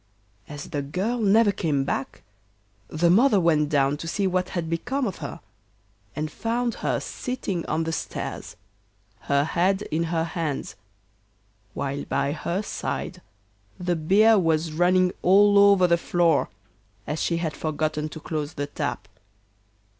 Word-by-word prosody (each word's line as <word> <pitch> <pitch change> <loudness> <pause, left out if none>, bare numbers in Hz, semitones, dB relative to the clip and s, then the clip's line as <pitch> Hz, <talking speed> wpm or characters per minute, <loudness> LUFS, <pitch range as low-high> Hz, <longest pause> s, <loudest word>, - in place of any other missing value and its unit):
As 145 +1 -8
the 145 -3 -1
girl 190 - -2
never 215 0 +4
came 150 -7 0
back 135 0 -4 0.6
the 170 +2 +2
mother 215 +2 +5
went 155 -4 +2
down 140 -1 +2
to 165 - -7
see 200 +4 -1
what 185 -1 0
had 170 -3 -3
become 245 +12 -2
of 195 - -3
her, - - -7 0.7
and 155 0 -3
found 235 +4 -1
her - - 0
sitting 205 -9 -4
on 160 +1 0
the 165 - -2
stairs, 160 - -5 0.6
her 140 0 +1
head 185 +5 +1
in 165 +2 0
her 165 0 0
hands, 160 -3 -3 1.0
while 140 0 -3
by 140 0 0
her 170 +6 -2
side - - -4 0.6
the 180 -1 0
beer 205 +7 +4
was 165 -2 +1
running 180 +3 +3
all 200 +2 +5
over 200 -2 +6
the 170 -1 +3
floor, 170 -4 +2 0.6
as 150 - -3
she 170 - 0
had 160 -4 -3
forgotten 155 0 -2
to 160 - -9
close 155 -1 -4
the 145 - -2
tap. 145 - -4
170 Hz, 145 wpm, -25 LUFS, 155-195 Hz, 1.0 s, over